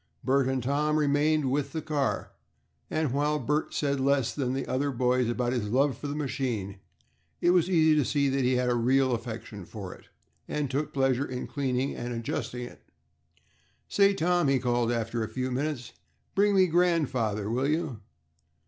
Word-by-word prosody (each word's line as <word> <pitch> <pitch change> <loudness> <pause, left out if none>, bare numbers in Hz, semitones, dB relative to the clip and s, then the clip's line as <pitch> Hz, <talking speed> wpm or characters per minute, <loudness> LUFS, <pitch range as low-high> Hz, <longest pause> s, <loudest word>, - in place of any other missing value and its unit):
Bert 135 +1 +2
and 130 -2 -1
Tom 150 +3 +1
remained 150 -1 +2
with 140 0 -1
the 160 - -2
car, 145 -3 -1 0.6
and 155 -4 0
while 150 +2 +1
Bert 150 +3 -1
said 140 -2 0
less 135 -2 +2
than 130 -3 -1
the 135 - -2
other 140 +2 0
boys 125 -1 +1
about 120 +1 0
his 110 -5 -2
love 135 +3 +2
for 145 - -6
the 145 - -3
machine, 125 -9 -3 0.6
it 175 - +3
was 180 -1 +3
easy 160 -3 +4
to 150 - +3
see 140 +1 +1
that 135 0 +1
he 125 +1 +2
had 125 0 +1
a 125 - +2
real 130 +2 +2
affection 115 -3 -5
for 95 0 -8
it, - - -17 0.4
and 145 -3 -2
took 145 +2 -1
pleasure 135 -1 +1
in 125 -1 -4
cleaning 135 -2 -1
and 120 0 -4
adjusting 120 +1 -3
it. 120 - -10 1.1
"Say, 200 0 +4
Tom," 175 -2 +2
he 135 -1 +3
called 120 -1 +1
after 115 0 -1
a - - -3
few 130 0 -3
minutes, 130 -3 -3 0.4
"bring 205 +1 +3
me 190 -1 +6
grandfather, 145 - +1
will 130 +4 +1
you?" 155 -6 -1
135 Hz, 180 wpm, -28 LUFS, 125-150 Hz, 1.1 s, me